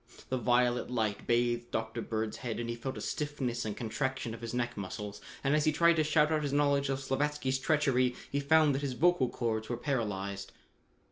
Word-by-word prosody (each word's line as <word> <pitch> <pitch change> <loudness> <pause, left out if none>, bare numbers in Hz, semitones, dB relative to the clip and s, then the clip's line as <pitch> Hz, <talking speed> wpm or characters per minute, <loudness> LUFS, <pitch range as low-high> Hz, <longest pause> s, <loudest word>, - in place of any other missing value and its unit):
The 130 - 0
violet 120 +1 +2
light 110 -4 -1
bathed 120 0 +1
Dr. 110 +1 -3
Bird's 110 -1 -3
head 120 -3 -4
and 120 - -3
he 115 - -2
felt 130 +3 -5
a - - -5
stiffness 135 -6 -2
and 105 -2 -4
contraction 130 +1 -2
of 115 - -9
his 115 -1 -4
neck 120 0 -1
muscles, 100 +1 -6 0.2
and 140 +2 +3
as 150 - +2
he 155 - +4
tried 170 +2 +4
to 155 - +4
shout 150 0 +3
out 155 -1 +2
his 145 -2 -2
knowledge 140 -1 +2
of 135 - +1
Slavatsky's 135 0 -1
treachery, 130 -4 +2 0.2
he 140 - +1
found 155 +1 +4
that 135 - -1
his 140 -3 -2
vocal 155 -2 +3
chords 110 -2 -2
were 120 - -1
paralyzed. 100 -7 -3
125 Hz, 205 wpm, -31 LUFS, 115-145 Hz, 0.2 s, he